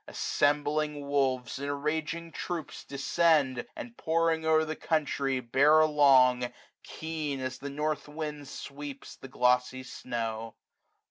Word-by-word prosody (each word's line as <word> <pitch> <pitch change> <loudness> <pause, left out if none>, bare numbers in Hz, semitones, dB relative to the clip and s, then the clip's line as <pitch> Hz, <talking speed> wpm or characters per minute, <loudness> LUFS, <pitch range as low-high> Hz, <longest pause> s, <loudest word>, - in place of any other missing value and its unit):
Assembling 145 0 0
wolves 130 -3 0
in 140 +1 -3
raging 160 +3 -2
troops 170 -3 -5
descend; 140 -1 +2
395 120 - -5 0.2
And, 240 -1 -17
pouring 165 -1 +1
o'er 160 0 +4
the 155 0 -4
country, 140 -4 0
bear 140 +6 +5
along. 130 -5 +5 0.3
Keen 155 -3 -4
as 130 0 -4
the 140 - -5
north 150 +2 -2
wind 150 -1 -6
sweeps 140 0 -8
the - - -10
glossy 125 0 +1
snow. 115 -3 -5
145 Hz, 125 wpm, -29 LUFS, 130-155 Hz, 0.3 s, bear